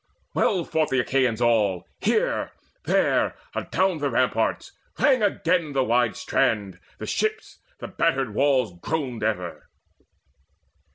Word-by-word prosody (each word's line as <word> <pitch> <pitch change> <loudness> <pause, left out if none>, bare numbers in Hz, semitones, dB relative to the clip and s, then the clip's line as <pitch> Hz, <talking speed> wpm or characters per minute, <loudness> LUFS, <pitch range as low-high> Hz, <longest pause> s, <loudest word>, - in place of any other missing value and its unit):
Well 185 -4 +1
fought 160 -1 0
the 130 - +1
Achaeans 125 -3 0
all, 105 -6 +2
Here, 440 - 0 0.3
there, - - +2 0.2
adown 185 -3 0
the 145 -1 0
ramparts: - - 0 0.3
rang 265 -5 +3
again 170 -6 +1
The 135 -1 +2
wide 120 -2 +2
strand 100 -4 0
and - - -24 0.2
the - - -6
ships: 435 0 -2 0.2
the - - -7
battered 135 -9 0
walls 130 -5 +2
Groaned 135 -7 -3
ever. 95 -6 -3
135 Hz, 125 wpm, -24 LUFS, 115-165 Hz, 0.3 s, rang